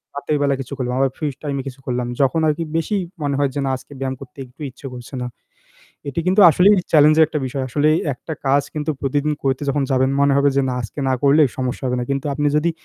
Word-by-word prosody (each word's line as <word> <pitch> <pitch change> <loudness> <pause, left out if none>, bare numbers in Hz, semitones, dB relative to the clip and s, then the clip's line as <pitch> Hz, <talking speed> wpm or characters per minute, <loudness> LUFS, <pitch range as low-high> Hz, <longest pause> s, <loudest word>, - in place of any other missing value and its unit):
রাতের 145 +1 -1
বেলা 140 -1 +2
কিছু 135 +1 -8
করলাম 125 -1 -2
আবার 135 -1 +2
ফ্রি 155 - -2 0.2
টাইম 145 -2 -2
কিছু 135 0 -8
করলাম। 125 -1 -2
যখন 135 +4 +2
আরকি 155 +2 0
বেশি 165 +6 -1 0.3
মনে 145 -1 0
হয় 140 -1 +2
যে - - -1
না - - 0
আজকে 130 - -19
ব্যায়াম 135 -1 -2
করতে 135 0 -12
একটু 125 +4 -19
ইচ্ছে 130 +2 -10
করছে 125 +2 -10
না। 125 - -3 0.8
এটি 140 +4 -2
কিন্তু 190 +3 +4
আসলেই 185 +6 +5 0.2
চেলেঞ্জ 155 -1 +6
এর 160 - +8
একটা 155 0 -3
বিষয়। 130 +1 -3
আসলে 145 +4 +1 0.2
১ 125 - -10
টা 160 - -2
কাজ 140 +1 +4
কিন্তু 150 0 -2
প্রতিদিন 145 +2 0
করতে 135 0 0
যখন 140 +1 +1
যাবেন 130 0 +2
মনে 140 0 +4
হবে 140 0 +4
যে 140 - +3
না 125 - -1
আজকে 115 +5 -9
না 130 - +2
করলে 145 +2 +5 0.2
সমস্যা 130 0 -3
হবে 125 0 0
না। - - -2
কিন্তু 140 +1 -1
আপনি 145 +1 0
যদি 160 +3 +2
140 Hz, 245 wpm, -20 LUFS, 130-150 Hz, 0.8 s, এর